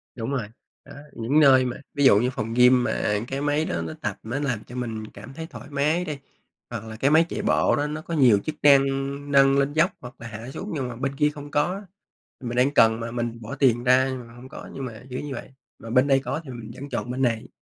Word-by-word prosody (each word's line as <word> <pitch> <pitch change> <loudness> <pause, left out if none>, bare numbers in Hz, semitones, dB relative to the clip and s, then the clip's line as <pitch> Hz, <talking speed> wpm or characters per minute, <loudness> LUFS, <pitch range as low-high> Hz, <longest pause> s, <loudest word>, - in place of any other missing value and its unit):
Đúng 115 +2 -4
rồi, 125 -6 -2 0.4
đó, - - -12 0.2
những 120 +7 +1
nơi 135 -3 +6
mà 125 - -3 0.2
ví 145 - 0
dụ 105 -6 +7
như 125 +3 +1
phòng 115 -3 -4
gym 125 +1 +5
mà, 120 - 0
à, 105 0 0
cái 135 +2 -3
máy 145 +2 +1
đó 85 - -2
nó 80 -1 -5
tập, - - -3
nó 120 +6 -3
làm 125 -7 -2
cho 120 - -12
mình 115 -3 -4
cảm 135 - -11
thấy 160 +3 -7
thoải 145 - -11
mái 150 +5 0
đi, 150 -3 -4 0.5
hoặc - - -5
là 110 0 -8
cái 135 +5 +1
máy 160 +2 +5
chạy - - -3
bộ - - +2
đó 145 +1 -1
nó 150 +1 -5
có 170 - -7
nhiều 125 -9 +5
chức 155 - -3
năng, 140 -2 +8 0.5
nâng 135 0 +5
lên 140 +1 +1
dốc 170 +5 +3
hoặc 125 0 -10
là 115 - -8
hạ 115 +2 -8
xuống, 200 +9 -6
nhưng 135 -5 -2
mà 120 - -6
bên 135 +3 -3
kia 150 +1 +3
không 145 -1 -10
có 145 - +3
á, 195 - -6 0.6
mình 120 -1 -4
đang 130 +3 +3
cần 110 -2 +5
mà 115 0 -5
mình 120 -1 -4
bỏ 110 - -6
tiền 120 -3 +2
ra 130 +1 +5
nhưng 125 -2 -6
mà 115 - -15
hông 125 +2 -12
có, - - -10
nhưng 135 - -5
mà 115 -3 -8
kiểu 125 - -4
như 145 -2 -5
vậy, 120 - -7 0.3
mà 115 - -9
bên 125 +4 +3
đây 135 -1 +4
có 145 +4 -4
thì 135 - -10
mình 120 -2 -8
vẫn 140 +1 -8
chọn 125 - -3
bên 130 - -3
này. 115 -3 0
130 Hz, 270 wpm, -24 LUFS, 115-145 Hz, 0.6 s, năng